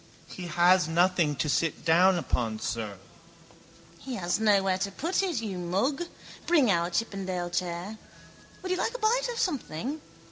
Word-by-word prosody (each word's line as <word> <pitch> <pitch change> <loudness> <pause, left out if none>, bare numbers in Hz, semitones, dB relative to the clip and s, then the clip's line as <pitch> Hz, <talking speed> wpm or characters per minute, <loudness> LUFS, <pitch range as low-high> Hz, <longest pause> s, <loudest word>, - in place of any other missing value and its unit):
—He 180 -2 -8
has 175 +1 +4
nothing 170 -2 +2
to 145 - -1
sit 160 +2 0
down 175 +2 +4
on, 115 -3 0
sir. 110 -4 -4 1.0
—He 265 -2 -6
has 175 0 -1
nowhere 195 -3 +3
to 200 - -1
put 335 - -1
it, 345 - -1
you 195 -4 -4
mug. 205 - 0 0.4
Bring 305 -9 +4
in 195 - +5
our 170 +1 0
chippendale 185 -3 -2
chair. 180 +4 -3 0.6
Would 370 - -3
you 370 - +1
like 465 - -1
a - - -1
bite - - +1
of 475 - -6
something? 285 - -2
185 Hz, 165 wpm, -28 LUFS, 170-260 Hz, 1.0 s, in